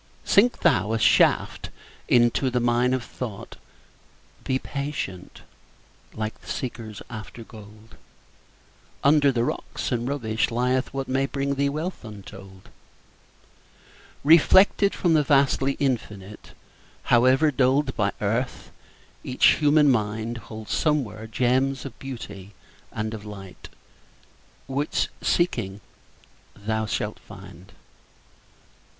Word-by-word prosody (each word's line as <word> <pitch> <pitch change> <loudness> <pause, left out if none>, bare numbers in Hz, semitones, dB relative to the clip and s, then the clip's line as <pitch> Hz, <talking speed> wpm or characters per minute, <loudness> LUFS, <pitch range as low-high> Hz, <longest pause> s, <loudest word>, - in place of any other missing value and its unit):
Sink 235 +5 +3
thou 110 - +2
a - - +1
shaft - - +3 0.4
into 120 +2 +3
the 125 0 0
mine 120 +1 +2
of 130 - -4
thought; 115 -6 -8 0.9
Be 130 - 0
patient, 140 -11 -6 0.7
like 110 0 -5
the - - -18
seekers 115 -5 -5
after 115 0 -9
gold; 110 0 -14 1.1
Under 145 0 +5
the 120 -2 0
rocks - - -4
and 120 -1 -1
rubbish 110 -6 -1
lieth 125 +2 0
what 135 -1 -4
May 135 +1 0
bring 140 0 -2
thee 140 0 0
wealth 155 +5 -4
untold. 95 -3 -12 1.5
Reflected 190 +6 +5
from 175 -3 +1
the 155 - +5
vastly 140 -1 +2
Infinite, 105 -8 -4 0.6
However 130 +6 +5
dulled 135 +1 +1
by 100 -2 +1
earth, 115 +5 -2 0.5
each 125 - +4
human 150 -1 +5
mind 110 +1 -2
Holds 110 -1 -6
somewhere 115 -9 -1
gems 130 +4 0
of 135 - -9
beauty 105 -7 -8 0.4
and 110 +1 -4
of 110 -2 -7
light 100 -3 -10 1.0
Which, 140 +3 -1
seeking, 100 - 0 0.8
thou 110 +1 -2
shalt - - -3
find. - - -13
125 Hz, 110 wpm, -24 LUFS, 110-140 Hz, 1.5 s, Under